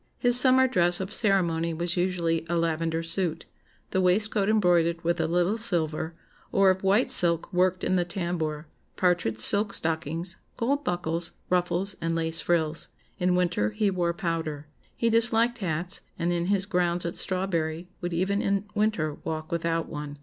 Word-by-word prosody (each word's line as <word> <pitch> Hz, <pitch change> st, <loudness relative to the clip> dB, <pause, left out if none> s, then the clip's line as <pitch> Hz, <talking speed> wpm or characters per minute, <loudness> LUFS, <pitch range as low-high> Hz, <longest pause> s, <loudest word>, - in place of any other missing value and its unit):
His 245 Hz, 0 st, +3 dB
summer 260 Hz, +1 st, +6 dB
dress 175 Hz, -7 st, +1 dB
of 190 Hz, +2 st, -3 dB
ceremony 170 Hz, -6 st, +1 dB
was 175 Hz, +1 st, 0 dB
usually 175 Hz, -3 st, 0 dB
a 170 Hz, -, 0 dB
lavender 165 Hz, 0 st, -1 dB
suit, 165 Hz, -1 st, -1 dB, 0.5 s
the 185 Hz, -, +1 dB
waistcoat 200 Hz, +2 st, +2 dB
embroidered 175 Hz, -5 st, +2 dB
with 170 Hz, +1 st, 0 dB
a 160 Hz, -, 0 dB
little 175 Hz, +6 st, +1 dB
silver, 165 Hz, -6 st, 0 dB, 0.4 s
or 195 Hz, -1 st, +4 dB
of 185 Hz, 0 st, -3 dB
white 200 Hz, +5 st, +2 dB
silk 170 Hz, +1 st, +2 dB
worked 180 Hz, 0 st, +1 dB
in 185 Hz, -, +1 dB
the 175 Hz, -, +2 dB
tambour, 170 Hz, -4 st, -3 dB, 0.3 s
partridge 175 Hz, -12 st, +1 dB
silk 200 Hz, -, +3 dB
stockings, 165 Hz, +2 st, 0 dB, 0.2 s
gold 280 Hz, +5 st, 0 dB
buckles, 170 Hz, -1 st, -1 dB, 0.2 s
ruffles, 180 Hz, +2 st, +1 dB
and 165 Hz, 0 st, -1 dB
lace 165 Hz, 0 st, 0 dB
frills. 165 Hz, -2 st, 0 dB, 0.3 s
In 180 Hz, 0 st, +2 dB
winter 175 Hz, -12 st, +1 dB
he 200 Hz, -, +1 dB
wore 175 Hz, -2 st, 0 dB
powder. 165 Hz, -4 st, -3 dB, 0.3 s
He 230 Hz, -1 st, +1 dB
disliked 230 Hz, +1 st, +2 dB
hats, 175 Hz, -2 st, -2 dB, 0.2 s
and 175 Hz, 0 st, 0 dB
in 170 Hz, 0 st, -1 dB
his 195 Hz, -1 st, +1 dB
grounds 175 Hz, -3 st, 0 dB
at 170 Hz, -, -2 dB
Strawberry 175 Hz, -3 st, -2 dB
would 175 Hz, 0 st, -3 dB
even 190 Hz, +4 st, 0 dB
in 200 Hz, 0 st, 0 dB
winter 205 Hz, -8 st, 0 dB
walk 155 Hz, 0 st, -5 dB
without 165 Hz, -1 st, -1 dB
one. 145 Hz, -1 st, -7 dB
175 Hz, 165 wpm, -26 LUFS, 165-195 Hz, 0.5 s, summer